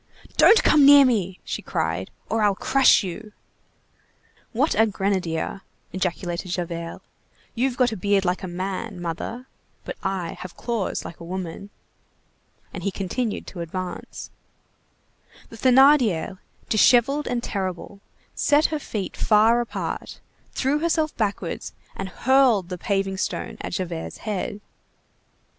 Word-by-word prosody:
"Don't 450 Hz, -, +6 dB
come 300 Hz, -2 st, +5 dB
near 285 Hz, 0 st, +9 dB
me," 195 Hz, -7 st, 0 dB
she -, -, -4 dB
cried, -, -, -2 dB, 0.2 s
"or 225 Hz, -, 0 dB
I'll 205 Hz, -2 st, +3 dB
crush 270 Hz, +1 st, +4 dB
you." 210 Hz, +4 st, -7 dB, 1.2 s
"What 270 Hz, +7 st, +1 dB
a 225 Hz, +1 st, +4 dB
grenadier!" 190 Hz, -3 st, -2 dB, 0.3 s
ejaculated 180 Hz, -1 st, -3 dB
Javert; 170 Hz, -1 st, -4 dB, 0.5 s
"you've 250 Hz, +1 st, -1 dB
got 250 Hz, -2 st, +3 dB
a -, -, -3 dB
beard 200 Hz, 0 st, +1 dB
like 180 Hz, +1 st, 0 dB
a 190 Hz, -, -5 dB
man, 185 Hz, +3 st, -4 dB
mother, 175 Hz, +9 st, -5 dB, 0.4 s
but -, -, -5 dB
I 190 Hz, -3 st, -3 dB
have 185 Hz, -, -9 dB
claws 230 Hz, -5 st, -2 dB
like 170 Hz, -, -9 dB
a -, -, -9 dB
woman." 185 Hz, +2 st, -6 dB, 1.0 s
And -, -, -6 dB
he 200 Hz, -, -1 dB
continued 205 Hz, +4 st, -3 dB
to 180 Hz, -, -9 dB
advance. 180 Hz, +2 st, -6 dB, 1.2 s
The 225 Hz, -, -11 dB
Thénardier, 250 Hz, -, +4 dB, 0.3 s
dishevelled 250 Hz, +6 st, +4 dB
and 240 Hz, -1 st, -2 dB
terrible, 190 Hz, 0 st, -4 dB, 0.3 s
set 295 Hz, +2 st, +3 dB
her 305 Hz, -, -1 dB
feet 210 Hz, -8 st, -5 dB
far 225 Hz, +2 st, +4 dB
apart, 240 Hz, -, -5 dB, 0.3 s
threw 280 Hz, +3 st, 0 dB
herself 320 Hz, -1 st, 0 dB
backwards, 200 Hz, -5 st, -3 dB, 0.2 s
and 195 Hz, 0 st, -5 dB
hurled 245 Hz, -5 st, +3 dB
the 180 Hz, -, -4 dB
paving 195 Hz, 0 st, -1 dB
stone 175 Hz, -2 st, -3 dB
at -, -, -5 dB
Javert's 175 Hz, -3 st, -4 dB
head. 205 Hz, 0 st, -3 dB
200 Hz, 130 wpm, -24 LUFS, 185-245 Hz, 1.2 s, near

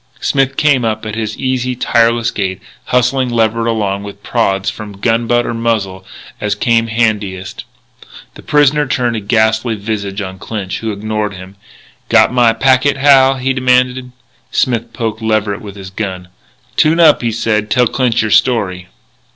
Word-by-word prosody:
Smith 135 Hz, -1 st, 0 dB
came 145 Hz, -5 st, +3 dB
up 110 Hz, -1 st, -2 dB
at 105 Hz, -, -5 dB
his 110 Hz, -1 st, -4 dB
easy, 130 Hz, -1 st, -1 dB
tireless 115 Hz, -1 st, +2 dB
gait, 95 Hz, -2 st, -3 dB, 0.3 s
hustling 125 Hz, +1 st, +1 dB
Leverett 115 Hz, -1 st, 0 dB
along 100 Hz, -4 st, -1 dB
with 100 Hz, 0 st, -10 dB
prods 95 Hz, 0 st, 0 dB
from 105 Hz, 0 st, -5 dB
gun 115 Hz, +2 st, 0 dB
butt 120 Hz, 0 st, +2 dB
or -, -, -3 dB
muzzle, 110 Hz, -5 st, -2 dB, 0.4 s
as 105 Hz, -1 st, -1 dB
came 115 Hz, +2 st, +1 dB
handiest. 105 Hz, -4 st, -2 dB, 0.7 s
The -, -, -13 dB
prisoner 150 Hz, -1 st, +2 dB
turned 125 Hz, -2 st, 0 dB
a -, -, -1 dB
ghastly 110 Hz, +2 st, +1 dB
visage 100 Hz, -1 st, -4 dB
on 95 Hz, -2 st, -6 dB
Clinch, 100 Hz, -2 st, -5 dB
who 110 Hz, -1 st, -3 dB
ignored 105 Hz, 0 st, -3 dB
him. 95 Hz, +1 st, -11 dB, 0.5 s
"Got -, -, +4 dB
my 120 Hz, -2 st, +4 dB
packet, 130 Hz, +4 st, +2 dB
Hal?" 135 Hz, -1 st, +5 dB
he 130 Hz, +1 st, -1 dB
demanded. 125 Hz, 0 st, +1 dB, 0.4 s
Smith 115 Hz, -2 st, -1 dB
poked 115 Hz, -2 st, -4 dB
Leverett 110 Hz, -1 st, -1 dB
with 100 Hz, -2 st, -9 dB
his 95 Hz, -2 st, -9 dB
rifle: 95 Hz, -3 st, -4 dB, 0.5 s
"Tune 160 Hz, +2 st, +3 dB
up," 160 Hz, -3 st, +5 dB
he 120 Hz, -1 st, -1 dB
said; 105 Hz, -1 st, -1 dB
"tell 125 Hz, +3 st, +3 dB
Clinch 120 Hz, -1 st, 0 dB
your 110 Hz, -, -2 dB
story." 100 Hz, -5 st, +1 dB
115 Hz, 160 wpm, -15 LUFS, 105-125 Hz, 0.7 s, Hal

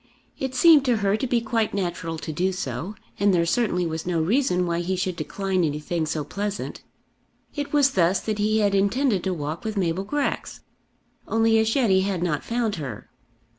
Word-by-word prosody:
It 265 Hz, -1 st, -3 dB
seemed 305 Hz, +1 st, +7 dB
to 245 Hz, -3 st, +2 dB
her 195 Hz, +1 st, +3 dB
to 260 Hz, +4 st, -2 dB
be 240 Hz, -1 st, +1 dB
quite 225 Hz, -2 st, -1 dB
natural 175 Hz, -4 st, -3 dB
to 155 Hz, -, -5 dB
do 180 Hz, +4 st, 0 dB
so, 170 Hz, -, -4 dB, 0.2 s
and 200 Hz, 0 st, +4 dB
there 170 Hz, -2 st, +2 dB
certainly 180 Hz, -2 st, +1 dB
was 160 Hz, 0 st, -4 dB
no 175 Hz, -2 st, 0 dB
reason 180 Hz, -, +1 dB
why 170 Hz, -1 st, -1 dB
he 180 Hz, +2 st, -1 dB
should 185 Hz, -1 st, -2 dB
decline 185 Hz, +3 st, -1 dB
anything 155 Hz, +2 st, -2 dB
so 155 Hz, -1 st, -2 dB
pleasant. 200 Hz, +7 st, -4 dB, 0.7 s
It 290 Hz, -1 st, -4 dB
was 285 Hz, -2 st, +4 dB
thus 180 Hz, -1 st, +2 dB
that 215 Hz, -1 st, -3 dB
he 215 Hz, +1 st, +2 dB
had 205 Hz, -1 st, +2 dB
intended 200 Hz, +1 st, +2 dB
to 190 Hz, -, 0 dB
walk 155 Hz, +1 st, -4 dB
with 220 Hz, -1 st, -4 dB
Mabel 180 Hz, 0 st, 0 dB
Grex; 285 Hz, +7 st, -3 dB, 0.7 s
only 225 Hz, 0 st, +3 dB
as 220 Hz, 0 st, +1 dB
yet 245 Hz, -7 st, +3 dB
he 190 Hz, 0 st, +4 dB
had 190 Hz, -3 st, -1 dB
not 155 Hz, -5 st, -1 dB
found 230 Hz, -4 st, -1 dB
her. 125 Hz, -9 st, -7 dB
195 Hz, 195 wpm, -24 LUFS, 170-225 Hz, 0.7 s, seemed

